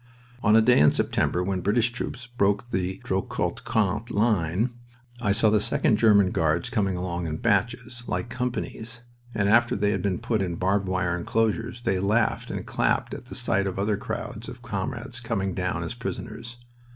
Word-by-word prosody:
On 105 +1 +4
a 110 - +6
day 125 +2 +5
in 75 - +7
September, 90 +4 0
when 95 0 -1
British 115 +5 +2
troops 125 0 -5
broke 120 -1 0
the 95 +1 -1
Drocourt 95 0 -2
Queant 110 +2 0
line, 105 0 +1 0.5
I 105 -4 +2
saw 110 +1 +3
the 105 -1 +3
Second 110 +1 +2
German 100 -4 +5
Guards 80 +1 +1
coming 100 -5 0
along 90 -1 -3
in 80 0 -3
batches, 120 +4 0
like - - -2
companies, 120 -1 -4 0.3
and 100 -2 +1
after 120 +3 +4
they 100 0 +1
had 95 -2 -1
been 95 -2 0
put 110 +2 -1
in 90 -3 -2
barbed 95 +3 +1
wire 90 -1 0
inclosures 115 +6 -1
they 95 -3 +1
laughed 105 +5 +1
and - - -4
clapped - - 0
at - - -7
the - - -8
sight 100 0 +1
of 95 - -4
other 100 +2 +1
crowds - - -5
of - - -11
comrades 120 - -4
coming 100 -5 -2
down - - -2
as - - -4
prisoners. 120 +1 -6
105 Hz, 180 wpm, -26 LUFS, 95-115 Hz, 0.5 s, in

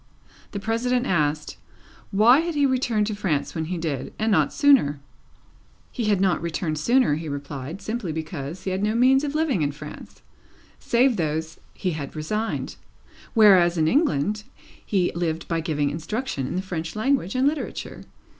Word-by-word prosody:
The 200 - -5
President 240 +4 0
asked, 150 - 0 0.5
why 225 +7 +6
had 335 0 -2
he 290 -1 +3
returned 245 -5 +1
to 215 - -2
France 155 -9 -1
when 160 -2 -2
he 180 +2 -3
did, 155 -6 -3
and 220 +1 0
not 195 - +3
sooner? 270 - +4 0.9
He 240 - -3
had 205 -3 +2
not 190 -2 +2
returned 165 -2 -2
sooner, 240 - +3
he 160 +1 -3
replied, 145 +4 -6
simply 215 -6 -3
because 160 +1 -5
he 190 - -2
had 190 +1 -2
no 210 +2 +1
means 260 +3 +4
of 290 0 -3
living 305 - +1
in 145 -1 +1
France, 150 +1 -11 0.6
save 240 0 +2
those 160 -1 -2 0.2
he 185 - -2
had 150 -3 -6
resigned; 210 +9 -3 0.6
whereas, 185 -6 +6
in 155 -1 +2
England, 210 - +1 0.4
he 185 -4 +1
lived 170 -1 -2
by 165 -1 0
giving 150 -3 -1
instruction 165 - -3
in - - -4
the 185 - -1
French 165 -3 -5
language 220 -3 0
and 260 +2 +3
literature. 300 +1 -3
185 Hz, 165 wpm, -24 LUFS, 155-235 Hz, 0.9 s, why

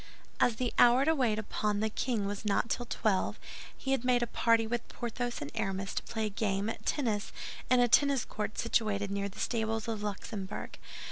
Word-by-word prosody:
As 235 - +4
the 245 +1 -1
hour 245 +3 +7
to 320 - +4
wait 245 -8 +1
upon 210 -1 -1
the 220 - +1
king 220 -1 -1
was 200 +1 -3
not 210 +2 +1
till 245 - -1
twelve, 210 -5 0 0.4
he 270 - -3
had 270 -3 +1
made 250 -1 +3
a - - +2
party 230 0 +3
with 235 +1 -2
Porthos 240 +1 -3
and 145 0 -5
Aramis 195 0 -2
to - - -1
play 220 -1 -3
a - - -1
game 200 0 -1
at - - -9
tennis 220 -8 0 0.4
in 255 - +5
a 245 - +5
tennis 280 +1 +4
court 210 -1 -4
situated 205 -3 +1
near 200 0 -1
the 200 - -15
stables 225 -1 -1
of 225 -2 -2
the 210 - -4
Luxembourg. 200 -1 -6
220 Hz, 205 wpm, -31 LUFS, 205-240 Hz, 0.4 s, hour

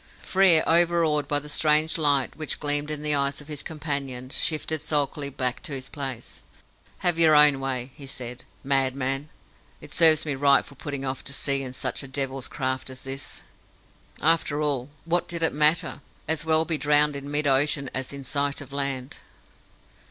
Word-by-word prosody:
Frere, 185 -4 +5
overawed 165 -3 +2
by 145 - +1
the 145 +1 -5
strange 155 +1 +2
light 145 -4 +1
which 155 -1 -2
gleamed 145 0 0
in 150 -1 -4
the 150 0 +1
eyes 140 0 0
of 145 - -13
his 150 -2 -3
companion, 140 -5 -4
shifted 160 -1 -1
sulkily 145 -1 -1
back 125 -2 -3
to 160 -6 -6
his 135 -1 -6
place. 135 -5 -6 0.6
"Have 175 -2 +1
your 160 -2 +6
own 150 -2 +7
way," 130 -1 -4
he 140 -1 -11
said, 125 -2 -7 0.2
"madman! 135 +1 -1 0.5
It - - -11
serves 160 -2 +6
me 150 - -1
right 140 0 +4
for - - -14
putting 140 0 -5
off 130 -1 -3
to 140 - -4
sea 140 0 +2
in 130 -2 -6
such - - -2
a 135 - -7
devil's 135 -1 -3
craft 130 -1 -3
as 130 0 -9
this!" 135 +1 -6 0.8
After 155 -2 +2
all, 145 -4 -1 0.2
what 175 +1 0
did 170 -1 -3
it 160 - +2
matter? 155 +1 +2 0.3
As 160 0 -1
well 160 0 +4
be 160 -3 -2
drowned 150 0 +3
in 140 0 -6
mid 145 +1 -1
ocean 140 0 +2
as 130 0 -3
in 140 -1 -8
sight 140 +1 -1
of 140 -1 -10
land. 140 -2 -2
145 Hz, 180 wpm, -25 LUFS, 135-155 Hz, 0.8 s, own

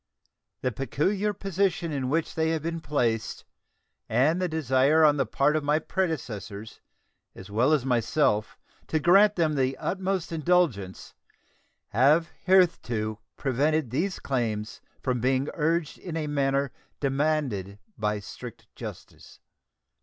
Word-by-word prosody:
The 130 - 0
peculiar 190 - 0
position 195 -3 -1
in 135 -3 -2
which 160 +3 0
they 160 0 0
have 160 -2 -1
been 165 0 -2
placed 115 -7 -1 0.6
and 145 +10 +2
the 180 - +1
desire 155 0 +3
on 145 -1 +4
the 135 - 0
part 145 +2 +2
of 155 - 0
my 150 +1 +2
predecessors 120 - -4 0.5
as 95 +2 -11
well 120 +7 +3
as 145 -5 +2
myself 120 -3 +1 0.3
to 155 - 0
grant 195 +6 +5
them 160 -3 +1
the 135 -2 0
utmost 190 -2 -2
indulgence 155 - 0 0.8
have 150 +9 +4 0.2
hitherto 120 - +2 0.2
prevented 145 0 0
these 180 +9 -1
claims 110 -5 -3 0.2
from 125 -2 0
being 130 +3 +1
urged 165 0 -1
in 170 -3 -5
a 155 - -2
manner 140 -2 0 0.3
demanded 135 -9 -1 0.2
by 105 -1 -1
strict 100 - -10
justice. - - -10
145 Hz, 130 wpm, -27 LUFS, 125-165 Hz, 0.8 s, grant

